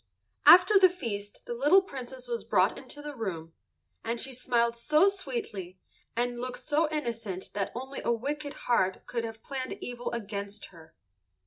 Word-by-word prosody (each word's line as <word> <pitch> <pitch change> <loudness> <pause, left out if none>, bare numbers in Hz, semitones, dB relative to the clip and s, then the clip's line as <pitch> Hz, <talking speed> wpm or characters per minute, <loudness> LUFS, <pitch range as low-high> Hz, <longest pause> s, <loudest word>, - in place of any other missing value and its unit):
After 365 +3 +9
the 375 -1 +8
feast 205 - -6
the - - -4
little 295 +11 +5
Princess 260 -6 -8
was 235 -1 -2
brought 190 0 +3
into 290 +2 -9
the 295 -1 -6
room, 170 -8 -5 0.5
and 230 +1 -2
she 265 +2 0
smiled 235 -1 +1
so 305 +10 +4
sweetly 375 - -4 0.4
and 240 0 -1
looked 250 0 -3
so 305 +1 +1
innocent 230 -11 -4
that 200 -1 -2
only 265 +3 -5
a - - +1
wicked 285 +5 -3
heart 190 -6 +1
could 235 -2 -3
have 225 -1 -7
planned 265 -2 -4
evil 245 0 -5
against 205 -2 -5
her. 160 -2 -16
240 Hz, 160 wpm, -29 LUFS, 210-290 Hz, 0.5 s, After